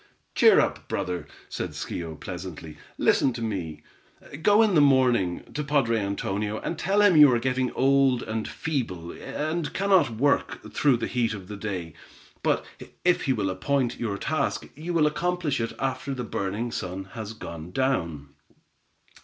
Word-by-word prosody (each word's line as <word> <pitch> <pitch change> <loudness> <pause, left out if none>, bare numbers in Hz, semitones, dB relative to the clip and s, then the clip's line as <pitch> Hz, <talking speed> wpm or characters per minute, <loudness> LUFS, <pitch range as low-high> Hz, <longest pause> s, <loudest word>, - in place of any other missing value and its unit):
"Cheer - - +6
up, - - -1
brother," 90 -1 -3 0.2
said - - -5
Schio, 80 -2 -5
pleasantly. 80 -2 -7 0.2
"Listen 130 - +3
to 115 - -6
me. 90 -8 -4 0.6
Go 205 +5 +5
in 215 -3 +2
the 155 - +6
morning, 125 -10 +3
to 150 - -2
padre 135 -6 +2
Antonio, 100 +1 -2
and 165 - -4
tell 200 +2 +2
him 200 -4 +6
you 150 -3 +9
are 120 - +3
getting 130 +1 0
old 135 -2 +3
and 110 0 -3
feeble, 105 - -3
and 155 +1 -3
cannot 190 -7 +4
work 130 +6 0
through 140 -4 +3
the 115 - -2
heat 120 -3 0
of 95 -3 -10
the 105 - -6
day, 95 -6 -5 0.5
but - - +1 0.4
if 180 -1 +3
he 135 - +2
will 100 -5 -1
appoint 125 +6 -1
your 105 -4 -2
task, 140 +5 -1
you 160 +4 -6
will 165 -3 +3
accomplish 170 -2 0
it 115 - -3
after 135 +1 -2
the 125 - -4
burning 105 +2 -3
sun 95 -2 -4
has 110 -1 -6
gone 85 -6 -8
down. 85 - -1
125 Hz, 160 wpm, -26 LUFS, 100-145 Hz, 0.6 s, you